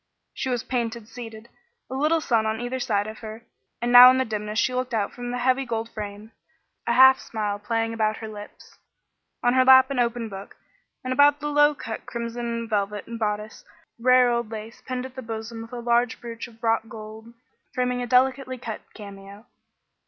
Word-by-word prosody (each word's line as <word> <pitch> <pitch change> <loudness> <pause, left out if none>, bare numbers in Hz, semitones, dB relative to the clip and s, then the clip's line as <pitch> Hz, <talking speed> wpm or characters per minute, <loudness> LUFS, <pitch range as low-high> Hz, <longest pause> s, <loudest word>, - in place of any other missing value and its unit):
She 265 - -3
was 245 -2 -1
painted 235 -3 -3
seated, 225 -2 -10 0.4
a - - -8
little 305 +4 +1
son 225 -6 +1
on 220 0 -2
either 245 +2 -3
side 210 -5 0
of 215 0 -8
her; 220 +1 -9 0.4
and 240 - 0
now 245 +1 +11
in 255 - +3
the 260 - +1
dimness 210 -1 -4
she 255 - +2
looked 255 -1 -2
out 205 -2 -1
from 245 0 -6
the 245 - -3
heavy 255 +2 +2
gold 230 -2 -3
frame, 210 +1 -7 0.6
a 235 - +2
half 265 +1 +7
smile 210 -2 -3
playing 225 +1 -1
about 215 -1 0
her 220 - -7
lips, 210 -1 -12 0.6
on 245 0 +3
her 260 0 +5
lap 260 +1 +7
an 270 - -1
open 235 -1 0
book, 195 -1 -9 0.5
and 255 0 -2
about 285 +1 +5
the 295 0 -3
low 295 0 +4
cut 225 -4 -7
crimson 235 0 -4
velvet 205 -1 -2
bodice 210 0 -3 0.4
rare 250 0 +5
old 235 -2 -1
lace 220 +1 -8
pinned 255 0 -3
at 260 - -9
the 260 - -6
bosom 225 0 -6
with 225 +1 -10
a 245 - -6
large 235 0 +1
brooch 230 -1 -7
of 230 0 -20
wrought 225 0 +1
gold, 220 +1 -10 0.4
framing 250 0 0
a 245 - -3
delicately 255 +1 +2
cut 230 -3 -6
cameo. 200 0 -11
235 Hz, 195 wpm, -24 LUFS, 220-255 Hz, 0.6 s, now